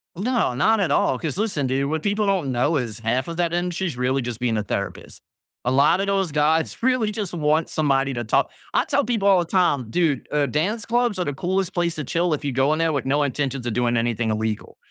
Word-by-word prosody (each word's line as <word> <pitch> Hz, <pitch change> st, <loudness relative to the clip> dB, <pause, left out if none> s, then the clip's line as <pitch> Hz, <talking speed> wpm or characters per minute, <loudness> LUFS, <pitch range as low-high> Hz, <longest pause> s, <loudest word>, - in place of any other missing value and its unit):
No. 225 Hz, -, 0 dB
Not 220 Hz, -, +3 dB
at 180 Hz, -7 st, +1 dB
all, 130 Hz, -2 st, +2 dB
'cause 160 Hz, +2 st, -3 dB
listen, 195 Hz, -11 st, -1 dB
dude. 135 Hz, +2 st, 0 dB
What 160 Hz, 0 st, -1 dB
people 205 Hz, +1 st, 0 dB
don't 190 Hz, -9 st, 0 dB
know 130 Hz, +6 st, +1 dB
is 115 Hz, -5 st, -4 dB
half 120 Hz, +4 st, -1 dB
of 170 Hz, 0 st, -6 dB
that 170 Hz, -1 st, 0 dB
industry 180 Hz, +1 st, -1 dB
is 140 Hz, -, -5 dB
really 130 Hz, +2 st, 0 dB
just 120 Hz, -2 st, -5 dB
being 120 Hz, -3 st, 0 dB
a 105 Hz, -, -1 dB
therapist. 100 Hz, -, -5 dB, 0.4 s
A 125 Hz, -, +1 dB
lotta 150 Hz, +8 st, +3 dB
those 195 Hz, -4 st, 0 dB
guys 155 Hz, +2 st, +1 dB
really 245 Hz, -4 st, +2 dB
just 205 Hz, -4 st, -4 dB
want 155 Hz, -1 st, +1 dB
somebody 140 Hz, -3 st, +1 dB
to 120 Hz, -1 st, -3 dB
talk 110 Hz, -, +1 dB, 0.2 s
I -, -, +2 dB
tell -, -, +1 dB
people 220 Hz, -4 st, 0 dB
all 195 Hz, -2 st, +6 dB
the 175 Hz, -, 0 dB
time, 165 Hz, -, +1 dB
dude, 155 Hz, -1 st, 0 dB
uh, 150 Hz, -1 st, +2 dB
dance 190 Hz, -, -1 dB
clubs 240 Hz, -3 st, +1 dB
are 180 Hz, -, 0 dB
the 145 Hz, -, -2 dB
coolest 185 Hz, +4 st, -1 dB
place 170 Hz, -2 st, 0 dB
to 155 Hz, -, -4 dB
chill 170 Hz, +4 st, 0 dB
if 150 Hz, 0 st, -3 dB
you 140 Hz, -, 0 dB
go 135 Hz, +4 st, +2 dB
in 155 Hz, -, -2 dB
there 165 Hz, -1 st, +1 dB
with 140 Hz, -3 st, -2 dB
no 145 Hz, +2 st, +2 dB
intentions 135 Hz, -2 st, -2 dB
of 115 Hz, -, -1 dB
doing 120 Hz, 0 st, +1 dB
anything 115 Hz, -1 st, 0 dB
illegal. 110 Hz, 0 st, -3 dB
150 Hz, 240 wpm, -23 LUFS, 130-185 Hz, 0.4 s, all